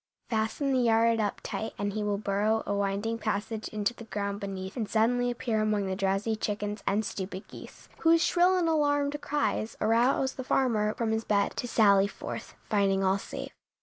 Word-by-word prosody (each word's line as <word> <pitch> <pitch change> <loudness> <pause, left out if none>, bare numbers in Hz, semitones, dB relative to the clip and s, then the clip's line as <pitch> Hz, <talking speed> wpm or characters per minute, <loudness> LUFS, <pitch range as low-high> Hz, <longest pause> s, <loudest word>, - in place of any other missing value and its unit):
Fasten 225 +5 0
the 260 - +3
yard 230 -1 +3
up 210 -2 -1
tight 220 - -4
and 205 0 -2
he 215 - -2
will 205 -1 0
burrow 210 +2 0
a - - -1
winding 200 +3 -1
passage 215 +1 -2
into 210 +2 -1
the 230 - -11
ground 200 -2 -3
beneath 195 -1 -5
and 225 -5 -3
suddenly 245 +2 +2
appear 235 -2 -1
among 210 -2 +1
the 190 0 -2
drowsy 195 +3 0
chickens 210 0 -3
and 210 +2 +1
stupid 190 0 -5
geese, - - -12
whose 330 0 +4
shrill 360 +1 +4
and 350 -2 +1
alarmed 290 -2 +1
cries 290 -6 -1
arouse 240 +4 +2
the 260 - -6
farmer 225 -5 +1
from 230 -2 -1
his 220 0 0
bed 200 -2 +1
to 245 - -3
sally 200 -4 +5
forth, - - -7
finding 195 -2 +2
all 190 +1 +2
safe. - - -7
220 Hz, 185 wpm, -29 LUFS, 200-240 Hz, -, sally